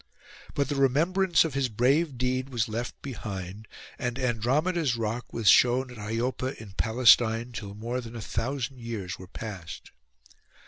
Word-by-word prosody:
But 140 -2 +1
the 145 - -2
remembrance 165 +7 +3
of 160 - -3
his 135 -2 0
brave 135 +6 +2
deed 130 +1 -1
was 120 -3 0
left 115 +2 -4
behind; 100 -5 -6 0.3
and 125 -2 -2
Andromeda's 135 +5 +1
rock 115 +2 -3
was 115 -3 -2
shown 125 +3 +5
at 120 - -10
Iopa 120 +5 -2
in 110 -3 -10
Palestine 115 +2 +4
till 100 -3 -7
more 120 +4 -3
than 120 -1 -9
a - - -5
thousand 125 +4 -3
years 115 -6 -5
were 95 - -10
past. 95 -5 -8
120 Hz, 150 wpm, -28 LUFS, 110-135 Hz, 0.3 s, shown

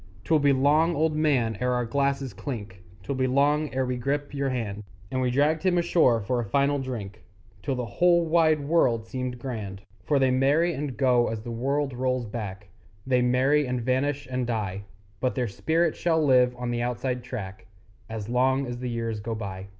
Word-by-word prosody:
'Twill 160 -2 +3
be 145 -1 +4
long, 150 +5 +3
old 155 +1 +1
man, 135 -8 +1
ere 125 0 +1
our 125 -1 0
glasses 140 +1 -1
clink, 105 -9 -7 0.2
'Twill 140 - -3
be 130 -1 0
long 145 +3 +2
ere 130 0 0
we 125 0 -2
grip 140 +4 -2
your 140 -1 -1
hand! 110 -5 -3 0.3
And 130 - -1
we 125 - +1
dragged 145 +5 +2
him 185 -2 +2
ashore 165 -9 +3
for 120 +5 -1
a - - 0
final 140 +6 +1
drink 115 -7 -6 0.4
Till 135 - -2
the 125 -1 -3
whole 170 - +3
wide 160 -2 +3
world 135 -7 +2
seemed 125 +1 -4
grand. 105 -6 -6 0.2
For 145 - +1
they 135 -1 +3
marry 145 +7 +3
and 140 -3 -4
go 125 -3 +3
as 110 -1 -4
the 120 - -6
world 135 +4 -1
rolls 130 0 -1
back, 105 -3 -6 0.4
They 125 -1 +2
marry 130 +4 +3
and 125 0 -1
vanish 130 +3 -1
and 125 -1 -1
die; 100 -4 -3 0.3
But 130 - -1
their 125 -2 0
spirit 160 - 0
shall 160 -2 +1
live 125 -2 +4
on 125 -1 -3
the 120 0 -1
Outside 125 +1 -2
Track 110 -5 -7 0.4
As 110 -2 -5
long 130 +3 +2
as 120 -1 -5
the 125 0 -3
years 115 -2 -3
go 110 +2 -4
by. 95 -3 -6
130 Hz, 195 wpm, -26 LUFS, 115-145 Hz, 0.4 s, be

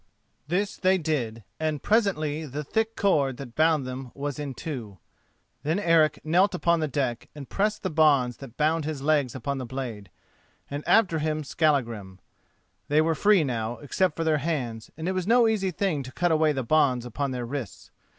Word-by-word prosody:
This 195 +5 -1
they 190 0 +3
did, 130 - -2 0.2
and 155 -2 -2
presently 160 -9 +1
the 145 +3 -5
thick 220 +8 -1
cord 140 - +2
that 130 -4 -9
bound 155 -2 +3
them 130 0 -6
was 145 0 -4
in 140 -3 -4
two. 120 -11 -6 0.6
Then 160 +5 0
Eric 165 -5 +3
knelt 180 +5 +3
upon 170 -1 +2
the 155 - 0
deck 125 -4 -2
and 140 -3 -8
pressed 210 +1 -1
the 185 - -1
bonds 140 -6 +3
that 130 -4 -11
bound 155 +1 +2
his 150 -2 -4
legs 145 -5 +2
upon 135 +2 -3
the 130 - -4
blade, 120 -7 -6 0.6
and 145 +1 -4
after 180 -8 +4
him 155 0 -1
Skallagrim. 120 - 0 0.7
They 150 +1 +3
were 165 +1 +2
free 200 +2 +4
now, 120 -3 -2
except 155 +4 0
for 165 - -2
their 155 -2 +2
hands, 125 -8 -3
and 160 +1 -4
it - - +1
was 185 -1 -2
no 235 0 +5
easy 210 -4 +1
thing 175 -3 -1
to 130 -1 -8
cut 175 +5 0
away 155 -1 +3
the 135 -3 -2
bonds 130 -2 +2
upon 140 +4 -2
their 125 -2 -3
wrists. 120 -5 -6
150 Hz, 190 wpm, -26 LUFS, 130-165 Hz, 0.7 s, no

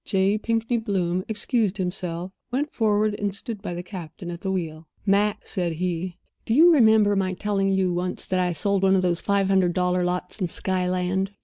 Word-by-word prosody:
J. 195 +2 +1
Pinkney 230 +2 0
Bloom 185 -4 -1
excused 220 -2 0
himself, 180 -1 -4 0.2
went 285 +5 -1
forward, 215 -1 +2
and 205 -2 -1
stood 210 0 -7
by 175 -4 -4
the 175 - -5
captain 175 -2 -8
at 170 0 -7
the 190 - -2
wheel. 160 -4 -4 0.2
"Mac," 205 +1 +2
said 175 -4 -2
he, 180 +1 -3 0.3
"do 225 - 0
you 335 +4 +7
remember 220 -6 +5
my 190 -1 0
telling 195 0 0
you 190 -2 +1
once 180 +1 -3
that 185 - 0
I 180 -1 +1
sold 195 +4 0
one 195 0 +4
of 185 - +2
those 175 -2 0
five 200 -1 +1
hundred 190 -3 +2
dollar 180 0 +1
lots 180 +4 -2
in 180 - +1
Skyland?" 185 +2 -1
190 Hz, 195 wpm, -24 LUFS, 180-205 Hz, 0.3 s, you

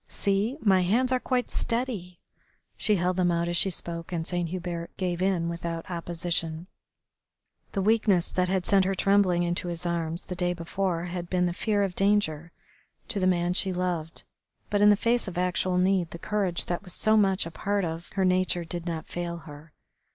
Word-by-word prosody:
See! 205 +7 0
My 190 -3 +4
hands 235 +8 +2
are 255 - +2
quite 250 -1 -1
steady." 230 -8 -2 0.6
She 210 - +3
held 180 0 0
them 180 -1 +3
out 170 0 0
as 175 - -1
she 190 - +4
spoke, 170 -1 -5
and 165 -2 -2
Saint 175 -1 -2
Hubert 175 -1 -4
gave 180 -2 -2
in 185 -3 +1
without 170 0 -4
opposition. 170 -1 -2 1.1
The 195 - 0
weakness 210 -4 +3
that 180 0 0
had 185 -1 0
sent 195 -2 +4
her 195 +1 0
trembling 190 -2 +3
into 175 +1 -1
his 175 0 -3
arms 170 -1 -1
the - - -6
day 175 0 0
before 175 0 -2
had 175 -1 -5
been 180 -1 +2
the 175 - 0
fear 205 +2 0
of 195 -2 -1
danger 180 -5 +1 0.6
to 205 - -1
the 185 - +2
man 175 -1 +2
she 190 +1 +3
loved, 175 -3 -3 0.5
but 205 -1 +2
in 210 - +7
the 205 - +7
face 235 +2 +1
of 180 - -6
actual 180 0 +1
need 185 -2 +2
the 170 - -7
courage 190 -1 0
that 175 - -2
was 180 -4 -8
so 215 0 +2
much 195 -4 +3
a 165 - -6
part 200 +2 -1
of 165 +1 -5
her 190 -1 +1
nature 185 -1 +1
did 175 +1 -5
not 165 -2 -3
fail 175 -1 -4
her. 150 +1 -12
180 Hz, 195 wpm, -27 LUFS, 170-195 Hz, 1.1 s, in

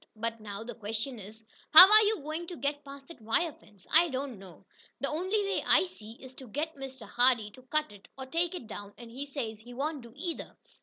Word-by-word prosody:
But 230 +1 -4
now 205 0 -7
the 240 - -7
question 225 +3 -5
is, 215 +3 -11 0.3
How 330 +4 +12
are 430 +2 +8
you 420 -5 0
going 315 +3 -5
to 355 - -7
get 285 +3 -2
past 275 0 -12
that 335 - -13
wire 295 +9 0
fence?" 205 -7 -21
"I 335 +2 +6
don't 265 -5 -4
know. 185 -4 -14 0.3
The 275 - -1
only 375 +7 0
way 400 0 -1
I - - +5
see 225 - -10
is 260 +2 -13
to 260 - -10
get 300 +8 -3
Mr. 265 -5 -9
Hardee 240 -2 +2
to 255 - -15
cut 305 +3 -1
it, 205 -1 -15
or 265 - -6
take 335 +6 -1
it 300 - -7
down, 205 -2 -9
and 235 -1 -11
he 275 +4 -6
says 235 -7 -5
he 240 +2 -12
won't 290 +2 -3
do 235 -1 -13
either." 335 +3 -6
265 Hz, 235 wpm, -30 LUFS, 225-310 Hz, 0.3 s, How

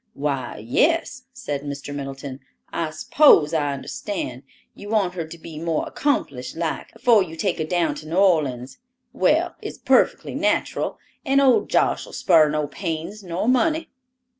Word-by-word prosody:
"Why, 140 -2 -3
yes," 255 - 0
said 150 - -4
Mr. 145 0 -6
Middleton; 135 -1 -6 0.3
"I 165 -2 -1
s'pose 155 - +4
I 145 -3 +1
understand; 185 - -5 0.3
you 205 - -10
want 205 -5 +1
her 170 -3 -4
to 170 - -10
be 160 -2 -9
more 165 -1 -1
accomplished 140 - -2
like, 165 -1 -3
afore 230 -4 +4
you 165 -3 -4
take 180 0 -1
her 155 - 0
down 175 0 +1
to 155 - -9
New 160 - -4
Orleans. 140 -10 +1 0.3
Well, - - +2
it's - - -7
perfectly - - +2
nateral, - - 0 0.3
and 275 -2 +3
old 265 -3 +4
Josh'll - - +1
spar 160 -4 +4
no 150 0 0
pains 165 +6 -5
nor 180 +2 -3
money." 315 +6 +2
165 Hz, 155 wpm, -23 LUFS, 145-205 Hz, 0.3 s, s'pose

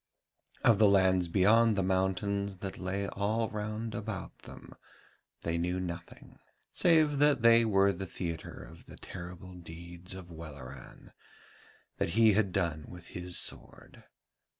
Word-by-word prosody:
Of 110 -3 +5
the 105 -2 +6
lands 95 -2 +4
beyond 110 +5 +4
the 95 - +1
mountains 95 +1 0
that 95 +1 -6
lay 95 +2 -2
all 110 +3 -1
round 110 +1 -4
about 105 -2 -5
them - - -12 0.7
they 85 0 -1
knew 90 +2 -1
nothing, 85 -1 -8 0.3
save 155 -4 +3
that 145 -4 +4
they 115 0 +7
were 100 -2 +3
the 95 +1 -6
theatre 85 -2 -6
of - - -14
the - - -12
terrible 90 +1 -9
deeds 85 +1 -9
of 90 -2 -10
Welleran, 70 -5 -11 0.9
that - - 0
he 110 -2 +6
had 100 -2 +2
done 85 -5 -1
with 85 -1 -11
his 90 0 -2
sword. - - -4
95 Hz, 140 wpm, -31 LUFS, 85-105 Hz, 0.9 s, they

